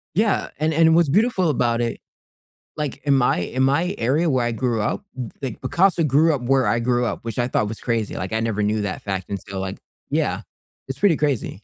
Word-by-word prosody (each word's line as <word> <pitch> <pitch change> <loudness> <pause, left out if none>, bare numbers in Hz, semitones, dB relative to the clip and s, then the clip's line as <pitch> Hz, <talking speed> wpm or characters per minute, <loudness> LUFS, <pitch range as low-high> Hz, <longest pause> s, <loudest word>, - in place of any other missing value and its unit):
Yeah, 215 +1 +1
and 155 +1 +1
and 160 +1 +5
what's 170 -4 +4
beautiful 195 - +2
about 120 -4 +1
it 115 -1 -2 0.8
like, 150 -3 -4
in 140 -1 +3
my 130 -7 +3
in 130 +9 -1
my 165 +8 +2
area 150 +8 +1
where 125 -3 +1
I 120 - -1
grew 115 -1 -1
up, 155 - -2
w 125 -4 -5
like, 130 -5 -5
Picasso 180 -1 +2
grew 155 +2 +3
up 135 - -3
where 130 +2 +2
I 115 - +2
grew 120 +1 +1
up, - - -2
which 115 0 -5
I 120 - +2
thought 105 -4 0
was 110 - -6
crazy, 115 -3 -1
like, 95 +3 -4
I 110 - 0
never 110 -2 -1
knew 105 +1 +1
that 100 - -4
fact 95 -2 -4
and 100 -1 -3
so, 95 -1 -5
like 95 0 -4 0.3
yeah. - - 0 0.5
It's 135 - -4
pretty 195 -6 +4
crazy. 145 -6 0
125 Hz, 225 wpm, -22 LUFS, 115-155 Hz, 0.8 s, and